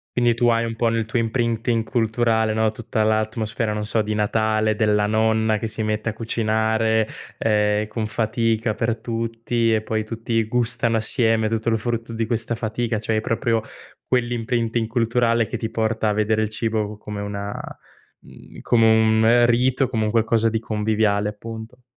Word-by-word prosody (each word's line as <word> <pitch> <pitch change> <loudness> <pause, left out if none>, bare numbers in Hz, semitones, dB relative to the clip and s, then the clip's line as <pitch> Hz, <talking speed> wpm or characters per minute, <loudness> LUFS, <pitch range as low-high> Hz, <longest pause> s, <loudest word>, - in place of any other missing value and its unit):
Quindi 120 -1 +3
tu 120 +1 +1
hai 115 0 +2
un 115 0 -4
po' 115 +1 +1
nel 115 -1 0
tuo 115 +2 -1
imprinting 115 0 0
culturale 110 -1 +1
no, 110 0 +1
tutta 110 0 -2
l'atmosfera 110 0 -1
non 105 0 -3
so 110 +1 +1
di 105 0 -2
Natale, 110 0 +1
della 105 -1 +2
nonna 110 0 +2
che 115 - -3
si 110 0 -3
mette 110 +1 -1
a - - -4
cucinare, 110 0 0 0.3
ehm, 105 -1 +1
con 110 0 -3
fatica 110 +1 0
per 115 +1 -1
tutti 115 0 -1
e 110 -1 0
poi 110 0 -1
tutti 115 0 -1
gustano 115 0 0
assieme 110 0 +2
tutto 115 +1 -1
il 110 - +2
frutto 115 +1 -3
di 115 0 -1
questa 115 0 -2
fatica. 115 +1 -2
Cioè 110 +1 -1
hai 110 - +1
proprio 115 0 0 0.5
quell' 125 -2 +1
imprinting 115 -1 -1
culturale 115 0 +1
che - - -4
ti 110 - -4
porta 110 -1 0
a - - +1
vedere 110 +1 +1
il 110 - -1
cibo 110 -1 -2
c - - -32
come 105 -1 -6
una, 100 0 -4 0.7
mhmm, - - -14
come 115 -2 +3
un 110 +2 +4
rito, 125 +2 +2
come 115 -3 -1
un 105 - -1
qualcosa 115 0 +2
di 110 0 -1
conviviale 105 -1 0
appunto. 115 +3 -9
110 Hz, 180 wpm, -22 LUFS, 110-115 Hz, 0.7 s, un